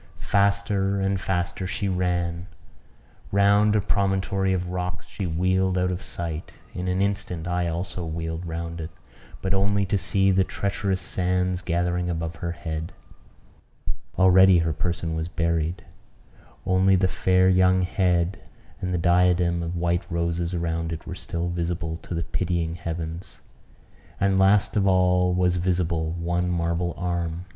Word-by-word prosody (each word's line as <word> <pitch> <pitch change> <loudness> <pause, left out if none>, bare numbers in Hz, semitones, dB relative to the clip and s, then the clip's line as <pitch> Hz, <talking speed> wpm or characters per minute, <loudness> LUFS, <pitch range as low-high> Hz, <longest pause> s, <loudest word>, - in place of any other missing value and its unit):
Faster 100 -1 +2
and 95 0 0
faster 90 0 -2
she 100 - -2
ran; 90 -1 -1 0.8
round 100 +1 +4
a 105 - +3
promontory 95 -1 0
of 90 -1 -1
rocks 90 -1 -4
she 95 - -4
wheeled 95 +3 +1
out 90 0 +1
of 90 +1 -4
sight; 85 -2 -5 0.2
in 90 +1 -4
an 90 +1 +1
instant 95 -4 -2
I 90 0 0
also 85 +1 -3
wheeled 80 +1 -4
round 85 0 -4
it, 80 - -5 0.5
but 95 0 0
only 100 +1 +2
to 100 +1 0
see 95 +2 +2
the 95 0 +4
treacherous 100 -1 -2
sands 90 0 0
gathering 90 0 0
above 85 -1 -3
her 85 -1 -3
head. 80 -1 -5 1.2
Already 95 0 +7
her 80 - 0
person 85 0 -2
was 80 0 -2
buried; 85 +2 -1 0.8
only 95 +1 +4
the 95 0 +3
fair 95 0 +2
young 95 0 +4
head 90 -1 +1 0.4
and 90 -1 -1
the - - +1
diadem 85 0 +3
of 85 +1 -3
white 85 0 0
roses 85 +1 -1
around 85 -1 -2
it 80 - -6
were - - -5
still 85 0 -4
visible 85 -1 -2
to 85 - -7
the 85 - -1
pitying 85 -2 -1
heavens; 85 0 -6 0.8
and, 100 -1 +2
last 100 +1 +4
of 100 -2 +2
all, 90 -1 +3
was 90 0 +2
visible 85 -2 0
one 85 +1 -1
marble 85 0 -1
arm. 85 -1 -2
90 Hz, 150 wpm, -25 LUFS, 85-95 Hz, 1.2 s, Already